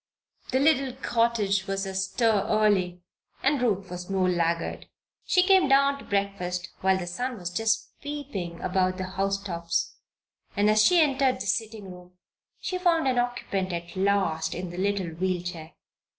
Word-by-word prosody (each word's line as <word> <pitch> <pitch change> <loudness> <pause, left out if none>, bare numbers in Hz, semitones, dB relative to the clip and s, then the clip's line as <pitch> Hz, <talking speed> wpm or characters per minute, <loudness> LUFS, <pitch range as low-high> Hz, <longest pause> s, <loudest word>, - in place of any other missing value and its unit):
The 260 - +1
little 275 -3 +3
cottage 230 -6 0
was 195 0 -2
astir 195 +2 +1
early 190 -5 +2 0.4
and 275 -1 +2
Ruth 200 -6 0
was 180 +1 -7
no 190 -1 +1
laggard. 170 -2 -1 0.4
She 365 - +4
came 380 -4 +5
down 275 +1 +4
to - - -11
breakfast 190 -3 -2
while 190 0 +3
the 185 - -4
sun 245 +8 -3
was 180 -2 -5
just 215 +2 0
peeping 265 -13 -5
above 185 0 0
the 185 - -3
house 195 +1 0
tops 170 -3 -2 0.6
and 205 +1 +4
as 215 0 +5
she 360 +6 +5
entered 270 -3 +2
the 195 - -4
sitting 210 0 -2
room 180 0 -13 0.5
she 365 -1 -3
found 335 -5 +2
an 255 -2 +2
occupant 220 -6 -2
at 170 +1 -6
last 190 -5 +1
in 180 0 -5
the 175 - -8
little 200 -2 0
wheel 180 +2 -2
chair. 165 -3 -7
195 Hz, 165 wpm, -26 LUFS, 180-245 Hz, 0.6 s, came